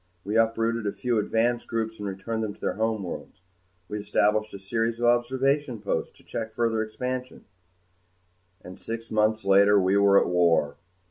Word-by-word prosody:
We 105 Hz, +3 st, -3 dB
uprooted 115 Hz, 0 st, +1 dB
a 100 Hz, -, -3 dB
few 120 Hz, -3 st, 0 dB
advance 115 Hz, +3 st, 0 dB
groups 110 Hz, -1 st, -3 dB
and 105 Hz, -, -4 dB
returned 100 Hz, +4 st, -4 dB
them 105 Hz, -2 st, -4 dB
to -, -, -25 dB
their -, -, -1 dB
homeworlds. 110 Hz, -5 st, -4 dB, 0.5 s
We 105 Hz, -, -4 dB
established 105 Hz, +1 st, +1 dB
a -, -, -7 dB
series 115 Hz, +4 st, -2 dB
of 120 Hz, -, 0 dB
observation 130 Hz, +2 st, +1 dB
posts 100 Hz, -, -3 dB
to -, -, -21 dB
check 110 Hz, -1 st, -6 dB
further 115 Hz, -1 st, +1 dB
expansion 125 Hz, +4 st, -5 dB, 1.2 s
and 90 Hz, +2 st, -11 dB
six 115 Hz, 0 st, -6 dB
months 110 Hz, -1 st, +1 dB
later 100 Hz, +1 st, +5 dB
we 95 Hz, +1 st, +2 dB
were 100 Hz, 0 st, +6 dB
at -, -, +1 dB
war. 85 Hz, -4 st, +2 dB
110 Hz, 165 wpm, -26 LUFS, 100-115 Hz, 1.2 s, were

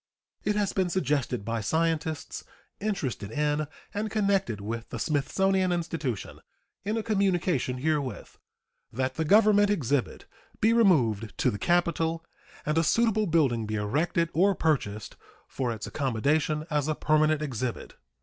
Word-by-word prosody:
It 210 Hz, -, 0 dB
has 205 Hz, -2 st, 0 dB
been 185 Hz, -2 st, +1 dB
suggested 140 Hz, -, -1 dB
by 115 Hz, 0 st, -2 dB
scientists 160 Hz, +4 st, -1 dB, 0.4 s
interested 135 Hz, -, -3 dB
in 150 Hz, +3 st, 0 dB, 0.3 s
and 215 Hz, +1 st, -2 dB
connected 195 Hz, -, 0 dB
with 115 Hz, +3 st, -5 dB
the -, -, -5 dB
Smithsonian 185 Hz, +5 st, +1 dB
Institution, 165 Hz, -, -3 dB, 0.4 s
in 215 Hz, +3 st, -1 dB
a 225 Hz, -, -1 dB
communication 180 Hz, -, +1 dB
herewith, 145 Hz, -1 st, -2 dB, 0.5 s
that 130 Hz, +2 st, -1 dB
the 160 Hz, -, -1 dB
Government 205 Hz, +2 st, +5 dB
exhibit 145 Hz, -, -1 dB, 0.3 s
be 220 Hz, +2 st, +4 dB
removed 120 Hz, -, +2 dB
to -, -, +2 dB
the 100 Hz, -, -5 dB
capital 165 Hz, -, +1 dB, 0.4 s
and 150 Hz, +2 st, +1 dB
a -, -, +2 dB
suitable 215 Hz, +4 st, +2 dB
building 135 Hz, -10 st, +2 dB
be 110 Hz, -, -2 dB
erected 165 Hz, +11 st, 0 dB
or 195 Hz, +4 st, +3 dB
purchased 105 Hz, -, -1 dB, 0.3 s
for 125 Hz, -3 st, -2 dB
its 110 Hz, -2 st, -5 dB
accommodation 145 Hz, +4 st, 0 dB
as 150 Hz, -1 st, +1 dB
a 155 Hz, -, 0 dB
permanent 155 Hz, 0 st, +2 dB
exhibit. 125 Hz, -4 st, -4 dB
155 Hz, 140 wpm, -27 LUFS, 130-190 Hz, 0.5 s, Government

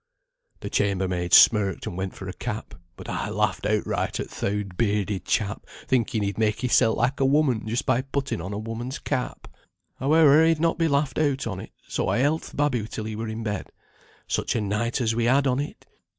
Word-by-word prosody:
"The -, -, -5 dB
chambermaid 95 Hz, -3 st, 0 dB
smirked 100 Hz, -5 st, +5 dB
and -, -, -5 dB
went 95 Hz, +1 st, -4 dB
for 95 Hz, -, -8 dB
a 90 Hz, -, -5 dB
cap, 110 Hz, 0 st, -5 dB, 0.2 s
but -, -, -10 dB
I -, -, -3 dB
laughed -, -, 0 dB
outright -, -, -1 dB
at -, -, -5 dB
th' -, -, -8 dB
oud 100 Hz, -2 st, -2 dB
bearded 100 Hz, -2 st, 0 dB
chap 105 Hz, -2 st, -1 dB, 0.2 s
thinking 115 Hz, -4 st, +1 dB
he'd 100 Hz, +1 st, -3 dB
make 110 Hz, +1 st, +1 dB
hissel 115 Hz, -3 st, +3 dB
like 125 Hz, +4 st, 0 dB
a 135 Hz, -, +3 dB
woman 135 Hz, -6 st, +2 dB
just 115 Hz, +3 st, -1 dB
by 130 Hz, -1 st, +2 dB
putting 135 Hz, -6 st, -3 dB
on 95 Hz, +4 st, -5 dB
a 100 Hz, -, -3 dB
woman's 115 Hz, +5 st, -5 dB
cap. 130 Hz, -4 st, -3 dB, 0.5 s
Howe'er 155 Hz, +2 st, +5 dB
he'd 165 Hz, -1 st, +2 dB
not 165 Hz, +1 st, +1 dB
be 165 Hz, -, +3 dB
laughed 140 Hz, -1 st, 0 dB
out 140 Hz, -3 st, +1 dB
on't, 100 Hz, -4 st, -5 dB, 0.2 s
so -, -, -2 dB
I -, -, +1 dB
held 145 Hz, +5 st, +2 dB
th' -, -, -11 dB
babby 130 Hz, -7 st, +1 dB
till 110 Hz, -, -5 dB
he 110 Hz, 0 st, -4 dB
were 110 Hz, +1 st, -4 dB
in 110 Hz, +1 st, -5 dB
bed. 105 Hz, -3 st, -4 dB, 0.6 s
Such -, -, -1 dB
a 115 Hz, -, +1 dB
night 105 Hz, +5 st, -1 dB
as 115 Hz, -2 st, +1 dB
we 115 Hz, 0 st, 0 dB
had 135 Hz, +3 st, +3 dB
on 130 Hz, 0 st, +1 dB
it! 145 Hz, -, -6 dB
115 Hz, 210 wpm, -25 LUFS, 105-135 Hz, 0.6 s, smirked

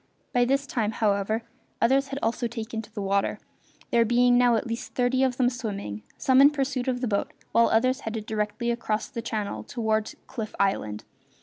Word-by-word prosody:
By 245 Hz, 0 st, +4 dB
this 275 Hz, +2 st, +1 dB
time, 225 Hz, -5 st, -1 dB
however, 215 Hz, +1 st, 0 dB, 0.4 s
others 270 Hz, +4 st, +3 dB
had 275 Hz, 0 st, -5 dB
also 235 Hz, +2 st, 0 dB
taken 225 Hz, 0 st, -5 dB
to 220 Hz, -, -15 dB
the 210 Hz, -2 st, -5 dB
water, 195 Hz, 0 st, +1 dB, 0.5 s
there 235 Hz, -, +5 dB
being 245 Hz, +2 st, +4 dB
now 245 Hz, -1 st, +5 dB
at 225 Hz, -, -1 dB
least 230 Hz, 0 st, -5 dB
thirty 250 Hz, +1 st, +2 dB
of 260 Hz, -2 st, +2 dB
them 250 Hz, -, +3 dB
swimming, 205 Hz, -, -4 dB, 0.2 s
some 260 Hz, 0 st, +4 dB
in 280 Hz, -, +9 dB
pursuit 270 Hz, -3 st, -2 dB
of 250 Hz, -1 st, 0 dB
the 250 Hz, -, 0 dB
boat 200 Hz, -2 st, 0 dB, 0.2 s
while 230 Hz, 0 st, +5 dB
others 255 Hz, +4 st, +2 dB
headed 220 Hz, -1 st, -5 dB
directly 215 Hz, +2 st, -1 dB
across 220 Hz, -2 st, -2 dB
the 235 Hz, -, -5 dB
channel 210 Hz, -, -3 dB
toward 220 Hz, -, -1 dB
Cliff 220 Hz, -4 st, -6 dB
Island. 105 Hz, -, 0 dB
230 Hz, 190 wpm, -26 LUFS, 215-250 Hz, 0.5 s, in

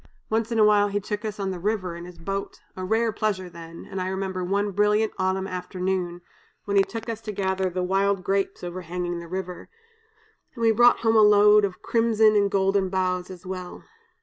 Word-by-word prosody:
Once 225 Hz, +1 st, 0 dB
in 230 Hz, -, 0 dB
awhile 210 Hz, -1 st, +5 dB
he 205 Hz, 0 st, -1 dB
took 210 Hz, +2 st, -5 dB
us 210 Hz, -1 st, -5 dB
on 195 Hz, -1 st, -2 dB
the 180 Hz, -, -5 dB
river 185 Hz, -2 st, -2 dB
in 170 Hz, 0 st, -8 dB
his 180 Hz, -1 st, -12 dB
boat, 195 Hz, +4 st, -5 dB, 0.2 s
a 185 Hz, -, -6 dB
rare 225 Hz, +4 st, +1 dB
pleasure 185 Hz, -5 st, -2 dB
then; 165 Hz, 0 st, -10 dB
and 190 Hz, -, -5 dB
I 185 Hz, -, -2 dB
remember 190 Hz, -1 st, -3 dB
one 200 Hz, +3 st, 0 dB
brilliant 210 Hz, +2 st, +2 dB
autumn 190 Hz, 0 st, 0 dB
afternoon, 180 Hz, -1 st, -3 dB, 0.4 s
when 200 Hz, -, -2 dB
he 200 Hz, -, +7 dB
took 225 Hz, +4 st, -5 dB
us 225 Hz, -1 st, -4 dB
to 215 Hz, -, -5 dB
gather 190 Hz, -1 st, -1 dB
the 180 Hz, +1 st, -3 dB
wild 195 Hz, +1 st, +1 dB
grapes 195 Hz, 0 st, -1 dB
overhanging 175 Hz, 0 st, -4 dB
the 170 Hz, -, -9 dB
river, 185 Hz, 0 st, -6 dB, 0.9 s
and 235 Hz, -, -4 dB
we 225 Hz, -, +5 dB
brought 240 Hz, +2 st, +5 dB
home 225 Hz, -1 st, +2 dB
a 220 Hz, -, +7 dB
load 210 Hz, 0 st, +6 dB
of 190 Hz, -2 st, -7 dB
crimson 225 Hz, -2 st, +3 dB
and 200 Hz, -1 st, +3 dB
golden 195 Hz, 0 st, +1 dB
boughs 180 Hz, -1 st, -1 dB
as 185 Hz, -1 st, -11 dB
well. 185 Hz, -1 st, -7 dB
195 Hz, 200 wpm, -25 LUFS, 185-210 Hz, 0.9 s, he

